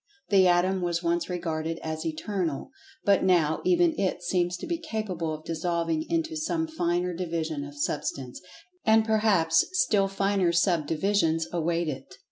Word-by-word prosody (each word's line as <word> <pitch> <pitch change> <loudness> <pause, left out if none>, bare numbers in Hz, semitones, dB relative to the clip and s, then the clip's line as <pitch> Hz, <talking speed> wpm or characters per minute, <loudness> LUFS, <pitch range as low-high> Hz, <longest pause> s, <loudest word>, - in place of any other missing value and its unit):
The 190 -2 +5
Atom 180 +2 +2
was 175 -1 -1
once 170 +1 0
regarded 165 -2 -3
as 160 +1 -3
Eternal, 165 - -3 0.3
but 200 -1 +4
now 170 -5 +2
even 350 -2 +3
it 185 -2 -1
seems 175 0 0
to - - -7
be 340 -1 -2
capable 195 - -3
of 155 0 -6
dissolving 165 -1 -1
into 325 -1 -1
some 320 +1 -1
finer 180 - -1
division 165 -4 -3
of 145 0 -10
Substance—and 220 - -1
perhaps 205 -7 +3
still 210 - +3
finer 195 -2 +1
subdivisions 165 0 +1
await 170 0 0
it. 135 -3 -6
175 Hz, 140 wpm, -27 LUFS, 165-200 Hz, 0.3 s, The